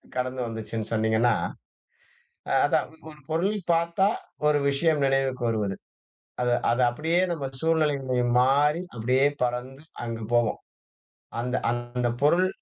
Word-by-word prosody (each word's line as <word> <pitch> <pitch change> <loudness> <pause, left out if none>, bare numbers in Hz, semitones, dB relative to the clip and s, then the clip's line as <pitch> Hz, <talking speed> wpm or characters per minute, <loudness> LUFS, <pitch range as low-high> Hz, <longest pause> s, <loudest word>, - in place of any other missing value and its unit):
கடந்து 130 0 -2
வந்துச்சுன்னு 110 -1 -5
சொன்னீங்கன்னா, 110 +2 +2 1.3
அதான் - - +2 0.2
ஒரு 150 -1 -13
பொருளை 185 +7 0
பார்த்தா 170 +3 +2 0.4
ஒரு 150 -1 +4
விஷயம் 145 +1 +2
நினைவுக்கு 135 -2 0
வருவது. 105 -3 -1 0.7
அதை 125 -1 +2 0.2
அதை 120 +2 +2
அப்படியே 160 +8 0
நம்ம 155 -5 -3
சூழ்நிலை 160 -1 +2 0.5
மாறி 145 +5 +3 0.2
அப்படியே 125 +4 +2 0.2
பறந்து 125 +3 -2 0.2
அங்கு 115 -1 -4
போவோம். 120 -2 +2 0.8
அந்த 125 +1 -2 0.2
அந்த 120 +1 -2
பொருள் 170 +6 +4
130 Hz, 115 wpm, -26 LUFS, 120-150 Hz, 1.3 s, ஒரு